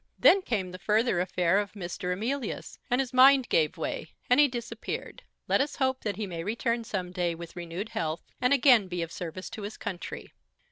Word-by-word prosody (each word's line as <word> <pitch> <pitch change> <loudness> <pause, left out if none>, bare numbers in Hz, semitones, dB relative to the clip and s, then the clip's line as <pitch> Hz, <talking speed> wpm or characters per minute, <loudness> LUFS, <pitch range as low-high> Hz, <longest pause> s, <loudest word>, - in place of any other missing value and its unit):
Then 390 - +6
came 200 - -2
the 185 - -8
further 215 -1 +2
affair 180 +1 +2
of 205 -1 -3
Mr. 180 -2 -4
Emilius, 230 +6 -3
and 245 - +2
his 260 -2 -1
mind 265 0 +7
gave 160 +2 +2
way; 160 - -3 0.2
and 250 - +6
he 295 - +7
disappeared. 235 -3 -5 0.3
Let - - +3
us 290 +1 -2
hope 260 -1 0
that 210 -2 -2
he 210 +2 -3
may 170 -3 -5
return 230 +3 -1
some 185 -5 -4
day 175 -2 -1
with 170 0 -9
renewed 175 +4 -5
health, 160 -6 -3 0.2
and 250 +1 +3
again 250 -7 +6
be 175 -2 -2
of 165 - -7
service 180 +2 -6
to 215 - -7
his 205 +1 -6
country. 175 -3 -6
205 Hz, 200 wpm, -28 LUFS, 180-245 Hz, 0.3 s, mind